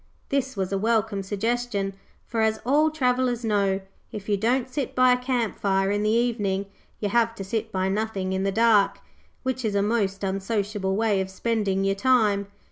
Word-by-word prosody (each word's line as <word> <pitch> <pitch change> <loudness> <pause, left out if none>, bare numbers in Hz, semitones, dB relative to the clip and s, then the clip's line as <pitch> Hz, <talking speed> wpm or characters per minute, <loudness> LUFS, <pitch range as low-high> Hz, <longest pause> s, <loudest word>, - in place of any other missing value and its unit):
This 270 -4 -1
was 190 -1 -2
a 195 - 0
welcome 220 -2 +1
suggestion, 205 0 -2 0.3
for, 230 -2 -2
as 220 0 +1
all 295 +5 +4
travellers 250 -5 0
know, 200 -2 +1 0.3
if 210 -2 -7
you 210 - +2
don't 240 +5 +1
sit 260 +1 -4
by 255 0 +5
a 250 - -1
camp 250 -4 -1
fire 195 0 +1
in 205 0 0
the 210 - +1
evening, 215 -4 +1 0.3
you 205 - -1
have 230 +1 +2
to 195 - -6
sit 220 +3 -3
by 190 -1 0
nothing 195 -2 -1
in 190 - -1
the 195 0 0
dark, 220 -1 +4 0.5
which 260 0 -2
is 215 -2 -1
a 200 - +2
most 205 -3 0
unsociable 195 0 -1
way 210 -2 +2
of 190 - -4
spending 195 -1 -1
your 195 0 +2
time. 210 -3 +2
215 Hz, 190 wpm, -25 LUFS, 195-235 Hz, 0.5 s, by